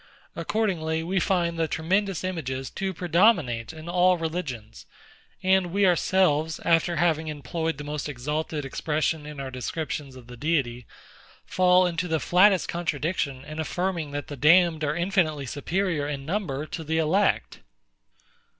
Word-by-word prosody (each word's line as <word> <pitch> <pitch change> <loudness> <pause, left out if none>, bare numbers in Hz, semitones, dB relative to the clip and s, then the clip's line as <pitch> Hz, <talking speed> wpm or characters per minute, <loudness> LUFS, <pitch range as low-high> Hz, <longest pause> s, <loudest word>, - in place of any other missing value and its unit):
Accordingly, 160 -7 -1
we 190 +3 0
find 170 -3 0
the 165 - +1
tremendous 190 +5 0
images 135 -8 -3
to 195 0 -3
predominate 170 - +2
in 160 0 -11
all 180 +1 +3
religions; 130 - -5 0.6
and 190 -1 +3
we 195 +3 +2
ourselves, 165 -3 +2
after 170 +1 +3
having 160 -1 +1
employed 155 +2 -3
the 145 - -6
most 150 0 -4
exalted 150 +3 -3
expression 150 +2 -1
in 150 -1 -8
our 135 -1 -5
descriptions 140 +1 -4
of 130 -2 -12
the 125 +1 -11
Deity, 125 -5 -1 0.6
fall 185 0 +4
into 175 0 -1
the 160 -2 0
flattest 185 +3 +4
contradiction 150 -4 -2
in 155 +1 -7
affirming 170 -1 -2
that 145 0 -4
the 145 - -7
damned 160 +3 +4
are 150 0 0
infinitely 170 -5 0
superior 160 +3 -1
in 140 -2 -4
number 155 -5 -2
to 160 +1 -6
the 160 +1 -1
elect. 170 +6 +1
160 Hz, 145 wpm, -26 LUFS, 145-180 Hz, 0.6 s, fall